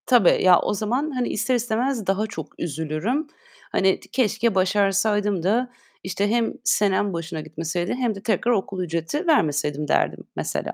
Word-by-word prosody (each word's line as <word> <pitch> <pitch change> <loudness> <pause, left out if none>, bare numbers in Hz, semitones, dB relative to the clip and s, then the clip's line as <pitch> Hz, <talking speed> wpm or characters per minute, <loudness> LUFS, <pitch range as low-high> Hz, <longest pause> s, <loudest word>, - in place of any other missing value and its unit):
Tabii. 245 -8 +4
Ya, 185 -2 +7
o - - -1
zaman, 245 +9 -1
hani, 250 -3 -1
ister 255 +4 0
istemez 240 0 -1
daha 195 +3 +1
çok 215 - -9
üzülürüm. 160 - -2 0.4
Hani 190 0 +2
ti - - -18
"Keşke 225 -3 +1
başarsaydım 200 0 +2
da," 240 +7 +1 0.3
işte, 190 +2 -1
"hem 230 +1 +1
senem 205 -3 +2
boşuna 165 -1 -4
gitmeseydi 165 +3 -3
hem 245 -4 -1
de 195 - -9
tekrar 230 +1 +1
okul 195 -4 -1
ücreti 170 - -3
vermeseydim." 150 - +1
derdim - - 0
mesela. - - -3
200 Hz, 155 wpm, -23 LUFS, 175-235 Hz, 0.4 s, Ya